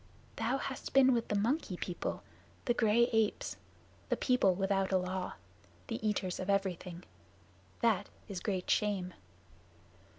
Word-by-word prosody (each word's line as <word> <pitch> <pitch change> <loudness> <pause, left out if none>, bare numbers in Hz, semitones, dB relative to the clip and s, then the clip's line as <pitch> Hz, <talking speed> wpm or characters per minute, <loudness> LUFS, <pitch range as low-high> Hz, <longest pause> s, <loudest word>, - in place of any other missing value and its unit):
"Thou 235 +4 +1
hast 270 -1 -5
been 265 -1 +7
with 235 -1 0
the 210 - 0
Monkey 215 - 0
People 175 0 -3 0.4
the 240 - +3
gray 230 0 +4
apes 220 -2 +1 0.5
the - - +1
people 250 -8 +3
without 195 0 +1
a 190 - +5
law 185 0 -2 0.6
the 225 -1 -3
eaters 195 -4 0
of 185 - -4
everything. 185 -3 -1 0.8
That 230 -5 +2 0.2
is 195 -3 -4
great 185 -1 -2
shame." 195 -4 +1
200 Hz, 135 wpm, -33 LUFS, 185-230 Hz, 0.8 s, been